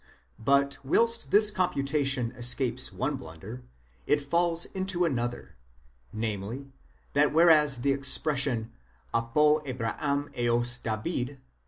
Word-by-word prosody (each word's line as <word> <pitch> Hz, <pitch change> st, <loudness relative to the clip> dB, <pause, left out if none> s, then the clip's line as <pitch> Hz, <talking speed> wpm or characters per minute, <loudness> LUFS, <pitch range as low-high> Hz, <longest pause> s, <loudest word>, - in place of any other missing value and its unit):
But 140 Hz, +4 st, +2 dB
whilst 230 Hz, +11 st, +1 dB
this 210 Hz, +1 st, +5 dB
computation 140 Hz, -, -1 dB
escapes 125 Hz, 0 st, 0 dB
one 135 Hz, +2 st, -2 dB
blunder, 110 Hz, +3 st, -10 dB, 0.5 s
it 145 Hz, -, +3 dB
falls 170 Hz, +3 st, 0 dB
into 190 Hz, -2 st, -1 dB
another; 120 Hz, -, -3 dB, 0.5 s
namely, 110 Hz, +5 st, -4 dB, 0.4 s
that 145 Hz, +1 st, +3 dB
whereas 150 Hz, -5 st, +4 dB
the 140 Hz, -, +3 dB
expression 135 Hz, -4 st, +1 dB, 0.4 s
ἀπὸ 115 Hz, 0 st, -1 dB, 0.3 s
᾿Αβραὰμ 140 Hz, +3 st, -3 dB
ἕως 120 Hz, 0 st, 0 dB
Δαβὲδ 120 Hz, +4 st, -2 dB
κ. 140 Hz, +1 st, -13 dB
135 Hz, 110 wpm, -28 LUFS, 120-150 Hz, 0.5 s, this